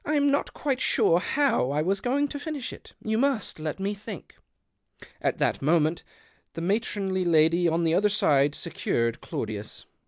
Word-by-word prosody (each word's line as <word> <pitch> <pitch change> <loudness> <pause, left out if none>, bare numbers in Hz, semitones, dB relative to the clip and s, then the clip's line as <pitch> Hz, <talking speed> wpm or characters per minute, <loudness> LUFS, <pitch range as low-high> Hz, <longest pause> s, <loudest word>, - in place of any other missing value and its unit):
I'm 290 -1 +2
not 285 - -1
quite 265 -3 -1
sure 170 - +3
how 270 - +1
I 150 +2 0
was 195 +3 0
going 280 +4 +1
to 285 - -5
finish 290 -4 -5
it: - - -14
you 220 0 0
must 270 - 0
let 155 +3 -4
me 195 +2 -1
think." 205 -3 -9 0.9
At - - 0
that - - 0
moment 155 +2 +2 0.5
the 165 - -5
matronly 195 -1 -1
lady 170 +1 +4
on 165 +1 +1
the 165 -1 +2
other 205 +4 +3
side 150 -9 +2
secured 115 -8 -2
Claudius. - - -5
190 Hz, 165 wpm, -26 LUFS, 160-250 Hz, 0.9 s, lady